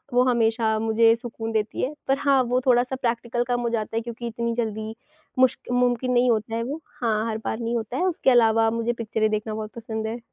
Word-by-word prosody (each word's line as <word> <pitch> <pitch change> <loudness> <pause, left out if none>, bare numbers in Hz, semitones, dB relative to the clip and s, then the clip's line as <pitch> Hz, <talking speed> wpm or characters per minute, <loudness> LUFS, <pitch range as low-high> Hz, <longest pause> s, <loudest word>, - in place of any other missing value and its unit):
वो 250 - +5
हमेशा 225 -2 +2
मुझे 225 +1 +4
सुकून 225 -1 -6
देती 215 -1 -1
है। 275 +4 -1
पर 270 0 +2
हाँ, 275 -2 +3
वो 250 +1 0
थोड़ा-सा 250 +1 +3
प्रैक्टिकल 240 0 -1
कम 245 0 0
हो 235 - 0
जाता 225 -1 -2
है - - +2
क्योंकि 235 0 -6
इतनी 235 0 -2
जल्दी 220 -1 -3 0.4
मुश्कि 255 -1 +2
मुमकिन 250 0 +1
नहीं 245 0 +4
होता 225 0 0
है 230 - -1
वो। 285 +6 -5 0.2
हाँ, 220 -1 +1
हर 220 - -3
बार 220 - -2
नहीं 230 +1 -1
होता 230 +2 -4
है, 355 - 0
उसके 335 -7 +2
अलावा 225 -2 +4
मुझे 230 +1 -1
पिक्चरें 220 -2 -1
देखना 215 0 -2
बहुत 215 0 -5
पसंद 220 -1 -4
है। 230 +2 -4
230 Hz, 220 wpm, -24 LUFS, 220-245 Hz, 0.4 s, वो